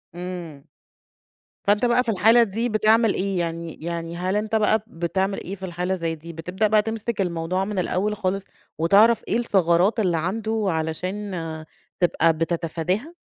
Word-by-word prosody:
إمم. 175 -5 -7 1.0
فأنت 205 +4 +3
بقى 245 +1 +3
في 230 - 0
الحالة 225 +4 +5
دي 230 +3 -2
بتعمل 220 0 +3
إيه 195 -1 -1
يعني، 165 -1 -3
يعني 170 0 -4
هل 185 +3 -1
أنت 215 +1 -1
بقى 215 0 +3
بتعمل 190 +2 -2
إيه 190 - -5
في 190 -1 -7
الحالة 180 +1 -2
زي 165 -2 -2
دي؟ 165 +2 -10
بتبدأ 180 +6 -1
بقى 210 0 +4
تمسِك 225 0 -3
الموضوع 175 +1 -1
من 205 -1 -2
الأول 195 +4 0
خالص، 195 -1 -2 0.3
وتعرف 205 +8 +5
إيه 225 - +1
الثغرات 190 -2 +2
اللي 180 -5 +2
عنده 215 +6 -1
علشان 185 +5 -3 0.7
تبقى 165 -2 +3
بتتفاداها؟ 170 - -2
190 Hz, 155 wpm, -23 LUFS, 170-215 Hz, 1.0 s, الحالة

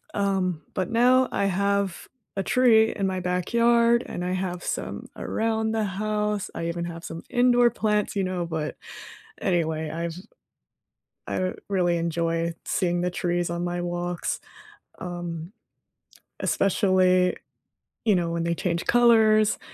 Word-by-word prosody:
Um, 190 -5 0
but 185 -1 -2
now 250 +2 +4
I 200 - 0
have 200 -1 0 0.3
a 195 - 0
tree 225 -1 +4
in 200 - -1
my 185 -1 -2
backyard, 235 +6 +2
and 175 - -4
I 180 - -1
have 185 -1 -3
some - - -4
around 220 0 -1
the 220 -1 0
house. 210 +1 -1
I 165 - -3
even 170 0 -3
have 170 -1 -7
some 165 -1 -7
indoor 245 -1 +4
plants, 210 -3 0
you 195 - +1
know, 185 -2 -2
but 160 -2 -3 0.7
anyway, 160 -4 0
I've 165 +1 -3 1.1
I 185 0 -1 0.2
really 175 -3 +1
enjoy 165 0 -1
seeing 175 -2 0
the 180 - 0
trees 175 -1 -1
on 170 0 -3
my 175 0 -2
walks, 175 0 -3 0.6
um, 175 -1 -6 0.9
especially, 185 -2 +3 0.7
you 215 -3 +4
know, 170 -2 0
when 170 0 -1
they 170 0 0
change 170 0 -2
colors 220 -3 +4
185 Hz, 135 wpm, -25 LUFS, 175-215 Hz, 1.1 s, now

